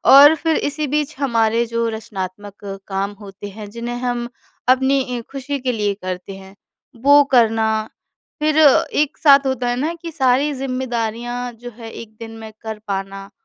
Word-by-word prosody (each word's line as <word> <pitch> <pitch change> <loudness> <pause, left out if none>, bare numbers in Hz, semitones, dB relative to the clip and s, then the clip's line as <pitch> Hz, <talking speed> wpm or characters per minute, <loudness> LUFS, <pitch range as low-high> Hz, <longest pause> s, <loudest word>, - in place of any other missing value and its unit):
और 290 +3 +9
फिर 320 +1 0
इसी 290 +1 -1
बीच 300 +2 -1
हमारे 230 -3 +2
जो 230 0 -1
रचनात्मक 205 -2 -7 0.2
काम 195 +1 -2
होते 200 0 -9
हैं, 205 0 -9
जिन्हें 235 +2 -5
हम 245 -1 -2 0.4
अपनी 265 +2 +4 0.2
इ - - -4
खुशी 280 +1 -4
के 255 -1 -1
लिए 210 -3 0
करते 185 0 -6
हैं 190 +1 -13 0.5
वो 285 +1 +7
करना, 220 -3 +3 0.5
फिर 305 0 +1 0.4
एक 295 -1 0
साथ 280 -2 +6
होता 255 -2 0
है 245 - 0
ना 315 +4 0
कि 335 - -5
सारी 270 +1 +2
जिम्मेदारियाँ 245 -2 -3
जो 245 0 -7
है 225 -2 -9
1 220 -1 -10
दिन 225 -1 -7
में 220 -1 -9
कर 220 -1 -5
पाना 195 0 -4
235 Hz, 165 wpm, -20 LUFS, 215-270 Hz, 0.5 s, और